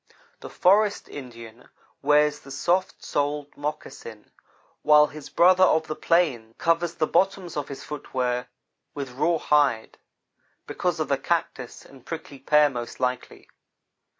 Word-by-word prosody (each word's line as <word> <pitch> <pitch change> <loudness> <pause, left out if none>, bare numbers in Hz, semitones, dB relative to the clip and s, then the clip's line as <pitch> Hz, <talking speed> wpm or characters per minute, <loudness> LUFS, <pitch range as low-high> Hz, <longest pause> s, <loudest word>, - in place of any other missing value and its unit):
The - - -9
forest 205 +3 +2
Indian 115 -3 -11 0.3
wears 150 0 +3
the 135 - -15
soft 175 +7 -1
soled 145 0 -2
moccasin, 140 -6 -7 0.5
while 150 0 +6
his 150 -1 -10
brother 185 +1 +5
of 160 -3 +3
the 155 - -5
plains 130 -10 0
covers 170 0 0
the 155 - +1
bottoms 190 0 0
of 145 -1 -3
his 140 - -8
footwear 125 -4 -3 0.5
with 140 -3 -5
rawhide, 145 -4 +1 0.7
because 175 -3 -2
of 155 - -1
the 140 -1 0
cactus 165 -7 -3
and 135 -3 -17
prickly 160 -4 -8
pear, 150 +2 +4
most 120 -4 -6
likely. 125 0 -3
150 Hz, 130 wpm, -25 LUFS, 130-165 Hz, 0.7 s, while